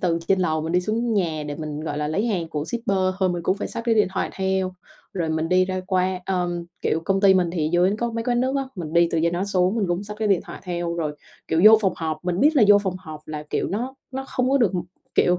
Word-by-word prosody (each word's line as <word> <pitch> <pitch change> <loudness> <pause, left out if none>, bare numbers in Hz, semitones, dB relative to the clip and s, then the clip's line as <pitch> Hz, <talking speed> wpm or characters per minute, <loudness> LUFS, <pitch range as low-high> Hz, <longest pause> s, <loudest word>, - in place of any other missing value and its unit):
từ 170 -2 +1
trên 195 - +4
lầu 155 -3 0
mình 160 - -3
đi 180 - +3
xuống 225 +4 -1
nhà 165 -6 0
để 145 - -4
mình, 150 -1 -5
gọi 150 -2 -4
là, 150 0 -1
lấy 200 +9 0
hàng 180 -8 -1
của 150 -2 -3
shipper 215 -3 -1 0.2
thôi 190 -1 +2
mình 175 -1 -2
cũng 185 +4 +1
phải - - -4
xách 230 - -5
cái 230 - +3
điện 210 -4 +3
thoại - - 0
theo, 190 -1 -1 0.4
rồi 170 -4 -2
mình 160 +1 -1
đi 185 0 +4
ra 185 0 -3
qua 185 -1 0
ờ, 180 -2 0 0.3
kiểu, 160 - +1
công 195 +1 +1
ty 195 -2 +6
mình 180 -2 +2
thì 155 -3 0
dưới 180 +4 +3
có 235 0 -1
mấy 230 0 -3
quán 240 -1 +1
nước 260 +2 0
á, 275 - +1
mình 165 -4 -6
đi 170 0 +4
từ 165 - +2
trên 170 0 +2
đó 175 +2 -1
xuống 190 0 +1
mình 210 -4 +1
cũng 175 +3 -1
xách 210 +1 -7
cái 215 -1 0
điện 190 -3 +3
thoại - - -9
theo. 175 -1 -2
Rồi, 155 -3 -3 0.3
kiểu, 160 - +2
vô 220 0 +9
phòng 190 -4 +1
họp, 160 0 -4
mình 180 +1 -1
biết 300 +1 +4
là 240 - +6
vô 205 - +8
phòng 190 -2 -3
họp 155 -4 -9
là 150 -1 -5
kiểu - - -1
nó 245 +6 -3 0.2
nó 265 +1 -4
không 255 0 0
có 275 - +4
được 225 -6 +3 0.4
kiểu, 180 0 +3
185 Hz, 285 wpm, -23 LUFS, 165-210 Hz, 0.4 s, vô